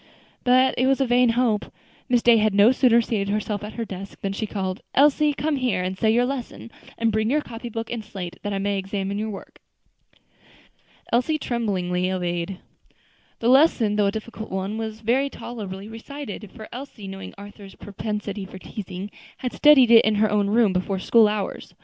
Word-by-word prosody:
But 255 +1 +4
it 255 - +3
was 270 0 +2
a 270 - +2
vain 245 0 +4
hope. 225 -4 +2 0.5
Miss 245 -2 +3
Day 235 -1 +6
had 215 -2 +2
no 205 +4 +7
sooner 245 -3 +4
seated 205 -3 -2
herself 210 0 -2
at 210 - -7
her 230 - -4
desk, 195 -1 -8
than 195 0 -2
she 215 +2 -3
called, 190 0 -3
"Elsie, 295 +2 +4
come 295 0 -1
here 235 -9 0
and 185 +1 -2
say 220 +3 +2
that 245 - +3
lesson; 250 -3 -5 0.3
and 230 0 +1
bring 215 +1 0
your 300 +4 +2
copybook 230 -2 -6
and 235 -2 -4
slate, 190 -4 -7
that 205 - -4
I 200 - -1
may 200 0 -1
examine 195 +1 -3
your 220 +1 -2
work." 200 - -9 1.5
Elsie 255 +6 +2
tremblingly 185 -9 -1
obeyed. 175 0 -2 0.8
The 230 - 0
lesson, 255 -6 +4
though 205 -1 +3
a - - +1
difficult 220 +1 -7
one, 190 +3 -3
was 220 0 -5
very 255 +5 +1
tolerably 205 -7 -7
recited; 225 -1 -8
for 215 - -10
Elsie, 250 -6 -8
knowing 195 0 -8
Arthur's 200 -1 -12
propensity 205 0 -5
for 190 0 -10
teasing, 195 0 -7 0.3
had 250 - -4
studied 275 -5 +6
it 230 -1 +8
in 215 0 +2
her 210 0 +2
own 205 -1 +2
room 215 -1 +3
before 190 +1 -1
school 220 +3 +4
hours. 210 -2 -4
215 Hz, 185 wpm, -23 LUFS, 195-240 Hz, 1.5 s, it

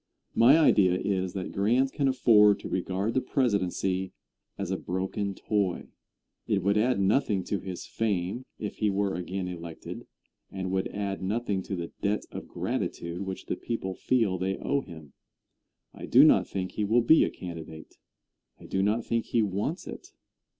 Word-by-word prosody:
My 125 +7 +6
idea 95 - +4
is 95 -2 -1
that 95 -2 -4
Grant 120 +7 +2
can 140 -2 +1
afford 110 -6 +5
to - - -6
regard 95 +4 -1
the 130 - +2
presidency 95 -7 0 0.4
as - - -3
a - - 0
broken 95 +2 -3
toy. 100 -4 -1 0.6
It 100 -4 +1
would 100 +1 +2
add 120 +2 +2
nothing 100 -1 +2
to 100 +2 -2
his 95 -2 -6
fame 105 +1 -2
if 105 - -5
he 105 - +1
were 100 0 0
again 90 +1 -3
elected, 85 -2 -8 0.4
and 95 -1 -4
would 95 0 0
add 100 -1 -4
nothing 100 0 -1
to 95 - -4
the 85 -2 -5
debt 105 +1 0
of - - -7
gratitude 85 +2 -3
which 95 - -5
the - - -2
people 105 -5 -4
feel 100 -3 +1
they 95 +1 -1
owe 140 0 0
him. 80 - -12 0.8
I - - -8
do - - +7
not - - +5
think 95 -1 -4
he 105 - -2
will 115 +4 +3
be 155 +7 +6
a - - +1
candidate. 80 -3 -9 0.6
I - - -13
do 95 - -1
not 105 +4 +1
think 115 -1 0
he 115 - +2
wants 105 - -2
it. - - -9
100 Hz, 170 wpm, -28 LUFS, 95-110 Hz, 0.8 s, do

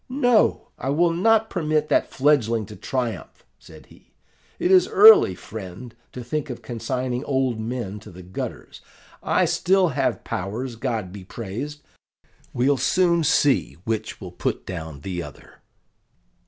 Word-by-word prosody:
'No, 245 -4 +2
I 135 - -3
will 165 +4 +3
not 220 +5 +3
permit 155 -3 0
that - - +2
fledgling 115 -6 +2
to 105 - -11
triumph!' 125 -2 -4
said - - -15
he: - - -22 0.4
'it 180 - 0
is 185 -1 +6
early, 205 - +7
friend, 100 +4 -9 0.2
to 125 - -8
think 145 +4 -3
of 125 - -7
consigning 125 +2 -3
old 130 -4 0
men 110 -3 -4
to 100 - -13
the 90 +1 -12
gutters. 90 +2 -7 0.4
I - - +2
still 190 -1 +2
have 135 - -1
powers, 115 +7 -4
God 115 -6 -3
be 100 -2 -9
praised! 120 +10 -7 0.7
We'll 135 +3 +2
soon 170 +5 +2
see 140 - +2
which 110 0 -3
will 90 -4 -8
put - - -3
down 80 -6 -7
the 90 +1 -4
other. 75 -5 -12
125 Hz, 145 wpm, -23 LUFS, 105-150 Hz, 0.7 s, early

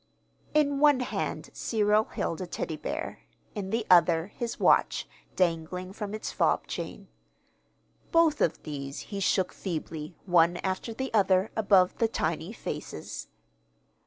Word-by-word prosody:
In 285 -2 +3
one 290 -3 +5
hand 250 - -3
Cyril 215 -1 +2
held 165 - -3
a 185 - -4
Teddy 160 - -3
bear, - - -5 0.3
in 200 -3 -4
the 225 +1 -1
other 170 0 +5
his 235 -1 -4
watch, - - +3 0.3
dangling 180 +1 -1
from 210 0 -5
its 215 - -4
fob - - +1
chain. - - -6 1.0
Both 330 -3 +4
of 165 - +1
these 140 -2 -5
he 200 - -2
shook 190 -1 +1
feebly, 160 -2 -5
one 175 -1 +4
after 190 +4 -2
the 265 +3 -4
other, 195 -1 +3
above 195 -4 +4
the 230 - +4
tiny 165 -3 -2
faces. - - -6
190 Hz, 135 wpm, -28 LUFS, 170-220 Hz, 1.0 s, one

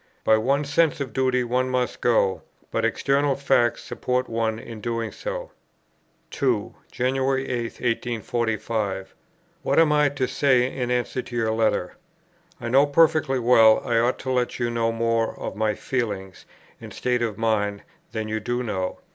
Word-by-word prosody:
By 110 - +5
one's 140 +6 0
sense 165 -3 +3
of 130 -5 -4
duty 130 0 +1
one 125 +2 0
must 125 -1 -1
go; 100 -5 +2 0.3
but - - -1
external 140 0 +1
facts 135 -4 +1
support 125 0 -2
one 115 -1 -1
in 115 -1 -9
doing 115 0 -2
so." - - -6 0.8
2. 120 -7 0 0.2
"January 130 +1 0
8, 120 -2 -1 0.2
1845. 110 -4 -2 0.5
What - - 0
am 160 -2 +5
I 150 -1 +4
to 135 -2 -2
say 130 -2 +2
in 125 -2 -2
answer 125 +1 -1
to 125 - -10
your 115 -2 +1
letter? 110 -5 0 0.6
I 120 - -5
know 135 +4 +4
perfectly 155 -2 +3
well, 115 -3 +6
I 115 -1 +2
ought 120 +2 +1
to 130 - -3
let 125 -1 0
you 120 -1 -1
know 115 -1 0
more 115 0 0
of - - -5
my 110 -1 0
feelings 100 -8 -4 0.3
and - - -9
state 125 -1 -1
of 110 -4 -2
mind 105 -3 0 0.3
than 110 -1 -3
you 110 0 -2
do 120 +3 -2
know. 95 -5 -3
120 Hz, 165 wpm, -24 LUFS, 110-130 Hz, 0.8 s, well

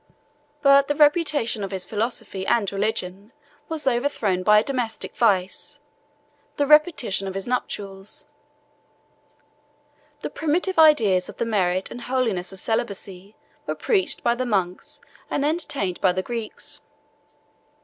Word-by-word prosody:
But 275 0 +6
the 290 - 0
reputation 295 - +2
of 195 - -3
his 190 -2 -3
philosophy 215 -3 -3
and 220 -5 +2
religion 200 0 -3 0.4
was 320 -3 -3
overthrown 240 -7 0
by 210 +3 +5
a 210 - +4
domestic 245 -4 -3
vice, 195 -5 0 0.8
the 285 - +2
repetition 300 - +3
of 190 - -5
his 195 - -3
nuptials. 200 -5 -4 2.0
The - - -5
primitive 335 +3 0
ideas 220 -13 +5
of - - -10
the - - -1
merit 190 -4 0
and 245 - -7
holiness 235 -9 -1
of 190 - -8
celibacy 200 -2 -3 0.3
were - - -2
preached 395 -5 0
by 235 - +3
the 250 +2 -2
monks 185 -5 -2 0.3
and 285 - 0
entertained 285 - -2
by 185 -2 +4
the 185 +1 -2
Greeks. 230 -1 -7
225 Hz, 130 wpm, -23 LUFS, 195-275 Hz, 2.0 s, But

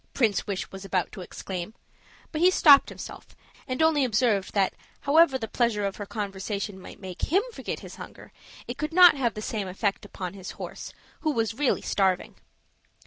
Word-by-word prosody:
Prince 220 -7 +1
Wish 195 -2 -3
was 195 0 -8
about 190 -3 -1
to 195 - -8
exclaim, 180 +3 -6 0.6
but 310 - -3
he 360 - +7
stopped 290 -6 +7
himself, - - -10 0.3
and 255 +4 0
only 315 -3 +4
observed 215 -5 +1
that 195 -2 +2 0.3
however 290 -1 +5
the 225 -3 -5
pleasure 225 -4 0
of 195 - -3
her 205 - -6
conversation 200 -1 -4
might - - -11
make 185 -2 -8
him 385 +4 +4
forget - - -5
his - - -10
hunger, - - -11 0.4
it 245 +2 -6
could 305 +2 -3
not 360 -1 +9
have 240 -6 0
the 215 - -5
same 210 -4 -3
effect 195 +3 -1
upon 185 -3 -6
his 195 -2 -8
horse, - - -7 0.3
who 310 - -1
was 225 -4 0
really 270 +2 0
starving. 190 -2 +1
215 Hz, 185 wpm, -26 LUFS, 195-275 Hz, 0.6 s, not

